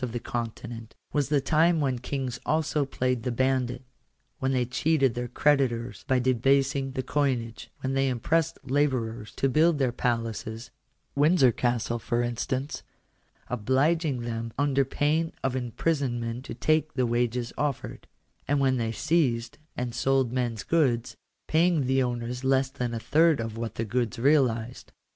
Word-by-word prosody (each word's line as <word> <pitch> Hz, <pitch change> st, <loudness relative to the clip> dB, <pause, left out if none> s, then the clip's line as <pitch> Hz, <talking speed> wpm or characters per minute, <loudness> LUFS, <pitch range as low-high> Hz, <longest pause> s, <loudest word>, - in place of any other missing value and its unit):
231 125 Hz, -, -2 dB
of 120 Hz, +1 st, -5 dB
the -, -, -10 dB, 0.3 s
Continent, 115 Hz, -2 st, -9 dB, 0.2 s
was 145 Hz, -2 st, +1 dB
the 145 Hz, -1 st, +3 dB
time 160 Hz, +4 st, +3 dB
when 130 Hz, -4 st, 0 dB
kings 130 Hz, 0 st, -4 dB
also 155 Hz, -2 st, +1 dB
played 125 Hz, -2 st, -1 dB
the 125 Hz, +2 st, -2 dB
bandit; 130 Hz, 0 st, 0 dB, 0.6 s
when 135 Hz, 0 st, 0 dB
they 125 Hz, -2 st, +1 dB
cheated 135 Hz, +1 st, +2 dB
their 120 Hz, +1 st, -3 dB
creditors 125 Hz, -3 st, +1 dB
by 130 Hz, -, +3 dB
debasing 135 Hz, +2 st, +2 dB
the 130 Hz, -1 st, -2 dB
coinage; 125 Hz, -5 st, -1 dB
when 130 Hz, 0 st, -2 dB
they 135 Hz, 0 st, +2 dB
impressed 165 Hz, +7 st, 0 dB
labourers 125 Hz, -6 st, -1 dB
to 135 Hz, -, +1 dB
build 155 Hz, +4 st, +3 dB
their 130 Hz, -3 st, +1 dB
palaces 115 Hz, -1 st, -3 dB, 0.4 s
(Windsor 145 Hz, -2 st, +5 dB
Castle, 120 Hz, 0 st, -1 dB
for 120 Hz, +1 st, -1 dB
instance), 130 Hz, +4 st, -3 dB, 0.7 s
obliging 130 Hz, +4 st, +1 dB
them 115 Hz, -1 st, -4 dB
under 140 Hz, -1 st, +2 dB
pain 150 Hz, +4 st, 0 dB
of 130 Hz, -1 st, 0 dB
imprisonment 125 Hz, -2 st, -2 dB
to -, -, -6 dB
take 155 Hz, +5 st, +1 dB
the 130 Hz, -2 st, +2 dB
wages 120 Hz, 0 st, -1 dB
offered; 140 Hz, -3 st, -3 dB, 0.4 s
and 145 Hz, 0 st, +2 dB
when 130 Hz, -1 st, +2 dB
they 115 Hz, -2 st, -1 dB
seized 125 Hz, -5 st, 0 dB, 0.2 s
and 125 Hz, -1 st, -3 dB
sold 130 Hz, 0 st, +1 dB
men's 120 Hz, -3 st, -2 dB
goods, 125 Hz, -8 st, +1 dB, 0.3 s
paying 165 Hz, -2 st, +3 dB
the 130 Hz, +1 st, +2 dB
owners 125 Hz, 0 st, -3 dB
less 130 Hz, 0 st, +2 dB
than 125 Hz, -4 st, -3 dB
a -, -, -2 dB
third 160 Hz, +4 st, +3 dB
of 115 Hz, -1 st, -4 dB
what 115 Hz, 0 st, -4 dB
the 115 Hz, -, -2 dB
goods 120 Hz, +2 st, -1 dB
realized. 125 Hz, -3 st, +1 dB
130 Hz, 155 wpm, -27 LUFS, 120-140 Hz, 0.7 s, Windsor